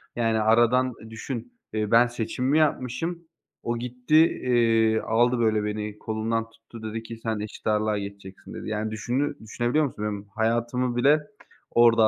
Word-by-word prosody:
Yani, 115 -2 +1
aradan 120 +3 +4 0.2
düşün, 120 - -6 0.2
ııı, 105 -1 -1
ben 120 +1 +6
seçimimi 125 +4 -1
yapmışım, 160 +4 0 0.4
o 120 0 -1
gitti, 125 +4 -1 0.3
iii, 115 -3 +3
aldı, 120 +2 +2
böyle, 110 -2 +2
beni 105 0 -4
kolumdan 110 +1 -1
tuttu 115 0 -14
dedi 110 +1 -4
ki, 115 0 -8
"Sen 110 -2 -1
eşit 105 +1 -7
ağırlığa 105 0 +1
geçeceksin." 100 -1 -8
dedi. - - -6
Yani, 110 0 -2
düşünü 130 +7 -2
düşünebiliyor 120 +7 0
musun 105 -5 -5
benim 105 -1 -4
hayatımı 120 +2 0
bile 140 +5 +5 0.5
orada 115 -2 +6
115 Hz, 150 wpm, -25 LUFS, 110-125 Hz, 0.5 s, ben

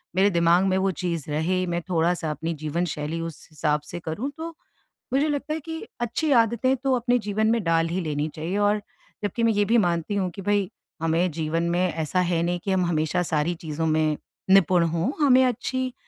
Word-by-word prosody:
मेरे 195 +2 +4
दिमाग 170 0 +4
में 190 -1 +2
वो 190 0 +1
चीज़ 170 -4 -3
रहे, 185 +5 0
मैं 175 0 -1
थोड़ा-सा 165 -2 +1
अपनी 160 +2 -3
जीवन 155 +3 -2
शैली 155 +1 -3
उस 165 -2 -7
हिसाब 150 0 0
से 175 +3 -7
करूँ, 170 - -4
तो 325 +1 -4 0.6
मुझे 285 +3 +3
लगता 290 +1 -2
है 320 - -2
कि 320 +2 -6 0.2
अच्छी 280 +6 0
आदतें 235 +4 +1
तो 270 +1 0
अपने 245 0 +2
जीवन 210 0 0
में 230 -3 +1
डाल 165 -1 +2
ही 180 +3 -1
लेनी 150 -2 -1
चाहिए। 165 +5 -3
और 205 0 +2 0.4
जबकि 205 +3 -1
मैं 230 -1 +4
ये 205 0 +2
भी 235 +3 +3
मानती 175 -1 +1
हूँ 190 -2 0
कि 195 - -6
भई 200 -1 +1 0.3
हमें 165 +2 +1
जीवन 165 +1 -1
में 175 +1 +1
ऐसा 160 +3 -1
है 175 -2 +1
नहीं 175 +1 -1
कि 195 - -1
हम 185 -2 +2
हमेशा 165 +1 0
सारी 160 0 0
चीज़ों 160 0 -3
में 155 -1 +2 0.3
निपुण 185 -2 +5
हो। 170 +8 0
हमें 260 -3 +6
अच्छी 255 +1 -1
180 Hz, 205 wpm, -25 LUFS, 165-210 Hz, 0.6 s, हमें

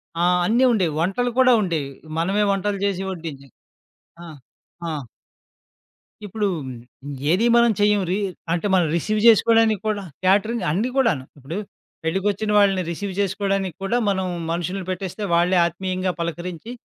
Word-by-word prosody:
ఆ! 170 - 0 0.2
అన్నీ 235 +6 +3
ఉండేవి. 185 -9 +1
వంటలు 235 +8 0
కూడా 255 -1 +6
ఉండేవి. 160 -7 -2 0.3
మనమే 195 +5 +1
వంటలు 200 0 -1
చేసి 195 -2 -1
వడ్డించి 155 -6 -8 0.8
ఆ! - - -9 0.6
ఆ! - - -2 1.3
ఇప్పుడు 205 +1 -2 0.8
ఏది 200 +6 +2
మనం 235 -1 +5
చెయ్యం. 205 0 +3
రి 190 - +1 0.4
అంటే 175 +4 -1
మనం 175 -3 +3
రిసీవ్ 215 +6 0
చేసుకోవడానికి 225 -2 +5
కూడా, 205 -2 -1 0.2
క్యాటరింగ్ 205 +4 +2
అన్నీ 210 +10 0
కూడాను. 225 - +2
ఇప్పుడు, 140 +6 -6 0.5
పెళ్ళకొచ్చిన 200 +5 -1
వాళ్ళని 195 -2 +3
రిసీవ్ 195 +3 -4
చేసుకోవడానికి 195 -2 -1
కూడా 230 +5 +1
మనం 190 -1 0 0.3
మనుషుని 180 +3 -3
పెట్టేస్తే 190 +3 -5
వాళ్ళే 180 +2 +3
ఆత్మీయంగా 185 +1 -3
పలకరించి 170 +4 -5
195 Hz, 130 wpm, -22 LUFS, 175-210 Hz, 1.3 s, కూడా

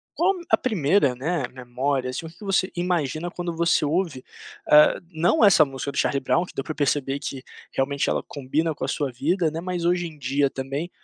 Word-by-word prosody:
Qual 370 +4 +2 0.2
a - - +5
primeira, 180 - +2
né, 150 +4 -2
memória, 125 +1 -2
assim, 145 +6 -5
o - - -7
que 165 - -16
que 210 - -12
você 195 -1 +1
imagina 175 -2 -1
quando 175 -1 -5
você 170 +1 +2
ouve, 155 -2 -1 0.5
eh, 150 0 +7
não 170 +6 +2
essa 195 -7 +7
música 135 0 -5
do 140 - -10
Charlie 140 - +1
Brown 170 +6 +1
que - - -13
deu - - -2
pra 155 - -5
perceber 140 -1 0
que 135 -2 -6 0.3
realmente 140 +1 0
ela - - 0
combina 150 +4 -1
com - - -5
a - - -3
sua 145 0 -1
vida, 160 +7 0
né, 160 - -5
mas 180 -2 -2
hoje 175 0 +1
em 155 -2 -10
dia 140 +1 +1
também, 135 +6 -4
150 Hz, 210 wpm, -24 LUFS, 135-175 Hz, 0.5 s, eh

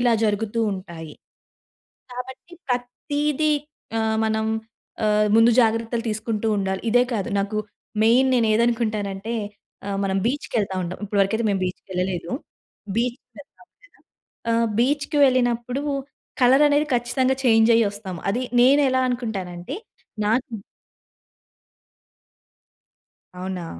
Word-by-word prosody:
ఇలా 245 -1 +3
జరుగుతూ 215 +2 0
ఉంటాయి. 170 -5 -8 1.0
కాబట్టి 260 +7 -8 0.2
ప్రతీదీ 290 +5 0 0.5
ఆహ్, 220 0 +1
మనం 220 0 0 0.6
ఆహ్, 210 0 +3
ముందు 225 +1 +6
జాగ్రత్తలు 230 +1 +1
తీసుకుంటూ 220 0 -2
ఉండాలి. 190 -1 -1
ఇదే 245 +2 +5
కాదు. 200 -4 -2
నాకు 200 +2 -3 0.5
మెయిన్ 245 +4 +5
నేనేదకుంటానంటే 220 -2 0 0.5
ఆహ్, 200 -1 -2
మనం 195 0 0
బీచ్‌కెళ్తా 230 -7 -1
ఉంటాం. 180 +1 -5
ఇప్పటివరకైతే 205 +2 +1
మేము 195 -1 0
బీచ్‌‌ 180 0 -4
కెళ్ళలేదు. 180 -2 -2 0.7
బీచ్‌ 240 +2 0 0.2
కెళ్తాం 290 - -15
కదా! - - -24 0.8
ఆహ్, 230 0 +2
బీచ్‌‌కి 285 +3 +1
వెళ్ళినప్పుడు 245 0 0 0.6
కలరనేది 290 +4 +5
ఖచ్చితంగా 255 +2 +1
చేంజ్ 225 -1 +5
అయ్యి 230 -2 +4
ఒస్తాము. 195 -4 -7
అది 245 +5 -1 0.2
నేను 275 +4 +6
ఎలా 260 0 +2
అనుకుంటానంటే 210 - -4 0.5
నాకు 235 +3 0 2.8
అవునా! 185 -1 -4
225 Hz, 105 wpm, -23 LUFS, 200-250 Hz, 2.8 s, ముందు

